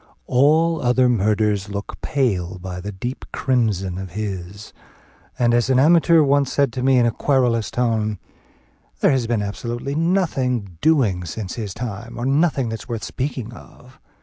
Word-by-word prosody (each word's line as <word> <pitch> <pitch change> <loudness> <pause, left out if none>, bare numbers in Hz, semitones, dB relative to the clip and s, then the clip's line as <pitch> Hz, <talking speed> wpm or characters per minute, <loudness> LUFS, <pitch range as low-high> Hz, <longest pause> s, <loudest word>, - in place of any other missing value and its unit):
All 155 - +3
other 125 +1 +3
murders 105 -3 +1
look 100 0 -6
pale 95 -10 -1
by 90 0 -7
the 100 +3 -5
deep 120 +7 -6
crimson 105 -8 0
of 95 -2 -8
his; 100 -1 -6 0.6
and, 120 -1 +2
as 120 +2 +2
an 130 - +3
amateur 165 +3 +5
once 140 -1 +2
said 140 -4 +1
to 125 - -3
me 130 0 +3
in 120 - +4
a 120 - +2
querulous 120 -3 +1
tone, 110 -4 0 0.8
"There - - +4
has 130 -4 0
been 115 -3 0
absolutely 120 +6 -4
nothing 135 - 0
doing 120 - +2
since 95 +3 -5
his 105 -5 -5
time, 115 -5 -6
or 120 - -3
nothing 135 -3 +1
that's 115 +3 -7
worth 115 -3 -4
speaking 130 -4 -4
of." 125 +2 -16
120 Hz, 160 wpm, -21 LUFS, 105-135 Hz, 0.8 s, amateur